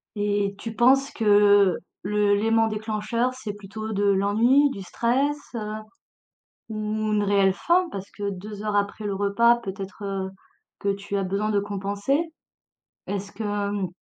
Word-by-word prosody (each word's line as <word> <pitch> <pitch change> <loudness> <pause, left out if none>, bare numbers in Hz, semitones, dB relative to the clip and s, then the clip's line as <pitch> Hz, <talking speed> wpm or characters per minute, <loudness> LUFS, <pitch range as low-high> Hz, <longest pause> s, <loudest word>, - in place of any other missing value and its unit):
Et 205 -1 0
tu 225 +1 -6
penses 270 +4 +4
que 205 -3 +5 0.3
le 205 +1 +2
lément 225 +2 +3
déclencheur 220 +3 -1
c'est 240 -5 -6
plutôt 210 +2 -7
de 205 0 0
l'ennui, 210 +8 +4
du 200 - -6
stress, 265 +9 0 0.2
heu, 215 -2 -4 1.0
ou 220 - -6
une 215 0 0
réelle 200 -1 +3
faim, 350 - +2
parce 195 0 -7
que 205 -1 -3
2 205 +2 -7
heures 210 -1 -1
après 205 +1 -1
le 205 -1 -1
repas 205 +4 +3
peut-être, 195 -2 -7
heu, 195 -1 -3 0.5
que 200 - 0
tu 200 0 -5
as 195 - 0
besoin 200 +3 -1
de 205 - +2
compenser? 205 - -1 0.8
Est-ce 200 0 -4
que, 220 - -6 0.3
mmh 200 -2 -1
205 Hz, 155 wpm, -25 LUFS, 200-225 Hz, 1.0 s, que